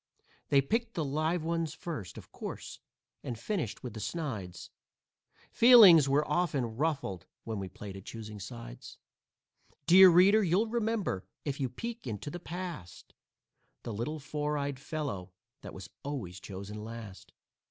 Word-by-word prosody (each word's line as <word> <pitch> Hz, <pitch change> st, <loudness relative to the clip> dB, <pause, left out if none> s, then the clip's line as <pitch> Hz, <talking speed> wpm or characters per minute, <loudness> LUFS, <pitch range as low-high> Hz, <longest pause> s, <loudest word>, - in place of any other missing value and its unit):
They 140 Hz, -1 st, +5 dB
picked 230 Hz, -, -1 dB
the 160 Hz, -, -1 dB
live 155 Hz, +4 st, 0 dB
ones 165 Hz, -2 st, -1 dB
first, 150 Hz, -, -6 dB
of -, -, -11 dB
course, -, -, -7 dB, 0.4 s
and 120 Hz, -, -4 dB
finished 155 Hz, -, -3 dB
with 125 Hz, -, -6 dB
the 110 Hz, -, -7 dB
snides; 105 Hz, -, -5 dB, 0.8 s
Feelings 200 Hz, -, +8 dB
were 145 Hz, +2 st, +2 dB
often 140 Hz, -10 st, 0 dB
ruffled 135 Hz, -, -2 dB, 0.2 s
when 110 Hz, -3 st, -4 dB
we 95 Hz, -1 st, -5 dB
played 95 Hz, +1 st, -9 dB
at 95 Hz, -, -9 dB
"choosing 110 Hz, -2 st, -8 dB
sides." 100 Hz, -, -9 dB, 0.9 s
Dear 185 Hz, +2 st, +9 dB
reader, 190 Hz, +5 st, +6 dB
you'll 185 Hz, +5 st, +3 dB
remember, 220 Hz, -, -1 dB, 0.2 s
if 140 Hz, -1 st, -3 dB
you 130 Hz, -2 st, 0 dB
peek 230 Hz, -, -6 dB
into 115 Hz, +6 st, -5 dB
the 175 Hz, -, -6 dB
past, 175 Hz, -, -7 dB, 0.7 s
The 115 Hz, -, -5 dB
little 120 Hz, +9 st, -3 dB
four 150 Hz, 0 st, -2 dB
eyed 140 Hz, -2 st, -3 dB
fellow 130 Hz, -, -4 dB, 0.3 s
that -, -, -8 dB
was -, -, -8 dB
always 115 Hz, -11 st, -5 dB
chosen 100 Hz, +3 st, -7 dB
last. 110 Hz, -3 st, -9 dB
145 Hz, 145 wpm, -31 LUFS, 105-170 Hz, 0.9 s, Dear